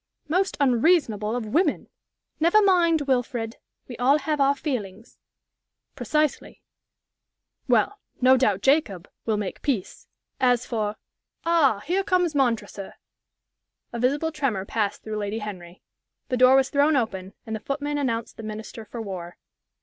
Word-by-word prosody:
"Most 370 Hz, +5 st, 0 dB
unreasonable 245 Hz, -, +2 dB
of 245 Hz, -2 st, -3 dB
women!" 300 Hz, -, 0 dB, 0.5 s
"Never 340 Hz, +7 st, +5 dB
mind, 350 Hz, -6 st, +4 dB
Wilfrid. 245 Hz, -4 st, -1 dB, 0.3 s
We 245 Hz, -, -8 dB
all 265 Hz, +4 st, +4 dB
have 300 Hz, 0 st, -1 dB
our 275 Hz, +1 st, +4 dB
feelings." 225 Hz, -, -5 dB, 0.8 s
"Precisely. 305 Hz, -2 st, -1 dB, 1.0 s
Well, 410 Hz, 0 st, +2 dB, 0.2 s
no 260 Hz, +1 st, +6 dB
doubt 210 Hz, -7 st, +1 dB
Jacob 235 Hz, -, +2 dB, 0.2 s
will 220 Hz, -2 st, +1 dB
make 205 Hz, -3 st, -4 dB
peace. 245 Hz, -11 st, -3 dB, 0.3 s
As 250 Hz, -2 st, +2 dB
for 215 Hz, -3 st, -2 dB, 0.5 s
Ah, 295 Hz, -11 st, +3 dB
here 370 Hz, +5 st, 0 dB
comes 360 Hz, -4 st, +1 dB
Montresor!" 230 Hz, -7 st, -1 dB, 1.0 s
A 235 Hz, -, -4 dB
visible 285 Hz, +6 st, +1 dB
tremor 265 Hz, -11 st, -2 dB
passed 205 Hz, -1 st, -2 dB
through 215 Hz, -1 st, -4 dB
Lady 205 Hz, +1 st, -3 dB
Henry. 185 Hz, -5 st, -8 dB, 0.5 s
The 255 Hz, -, 0 dB
door 255 Hz, +1 st, +6 dB
was 270 Hz, 0 st, +3 dB
thrown 290 Hz, +1 st, +3 dB
open, 195 Hz, -6 st, -2 dB
and 220 Hz, -, -4 dB
the -, -, -4 dB
footman 290 Hz, +4 st, -3 dB
announced 230 Hz, -5 st, -2 dB
the -, -, -7 dB
Minister 215 Hz, +1 st, -7 dB
for 225 Hz, +2 st, -7 dB
War. 180 Hz, -4 st, -7 dB
250 Hz, 140 wpm, -25 LUFS, 215-295 Hz, 1.0 s, no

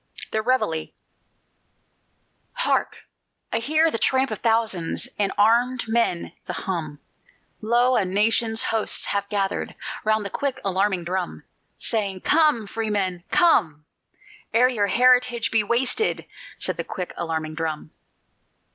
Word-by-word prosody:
THE 220 Hz, -, 0 dB
REVEILLE 215 Hz, -10 st, 0 dB, 1.7 s
Hark! -, -, -1 dB, 0.5 s
I -, -, +1 dB
hear 315 Hz, +6 st, +2 dB
the 230 Hz, -, -2 dB
tramp 265 Hz, 0 st, +2 dB
of -, -, -4 dB
thousands, 225 Hz, -7 st, 0 dB
And 200 Hz, -1 st, +1 dB
of -, -, -27 dB
armèd 240 Hz, +4 st, +2 dB
men 225 Hz, -6 st, 0 dB, 0.2 s
the -, -, -3 dB
hum; 160 Hz, -6 st, -4 dB, 0.6 s
Lo! 240 Hz, +3 st, +2 dB
a 220 Hz, -, +3 dB
nation's 220 Hz, +4 st, +2 dB
hosts 225 Hz, -1 st, +2 dB
have 200 Hz, 0 st, -2 dB
gathered 195 Hz, -2 st, -2 dB, 0.3 s
Round 215 Hz, -1 st, +1 dB
the 200 Hz, -, -4 dB
quick 280 Hz, -2 st, -2 dB
alarming 190 Hz, -1 st, 0 dB
drum, 180 Hz, +1 st, -4 dB, 0.3 s
Saying: 200 Hz, -4 st, -2 dB
"Come, 300 Hz, -8 st, +3 dB
Freemen, 200 Hz, -5 st, -2 dB
come! 165 Hz, -, +2 dB, 0.7 s
Ere 250 Hz, +2 st, +5 dB
your 210 Hz, -5 st, 0 dB
heritage 250 Hz, +2 st, +3 dB
be 225 Hz, -1 st, +3 dB
wasted," 250 Hz, -, +1 dB, 0.3 s
said -, -, -2 dB
the -, -, -2 dB
quick 180 Hz, -3 st, -5 dB
alarming 160 Hz, -2 st, -3 dB
drum. 155 Hz, -1 st, -4 dB
215 Hz, 130 wpm, -23 LUFS, 185-240 Hz, 1.7 s, Ere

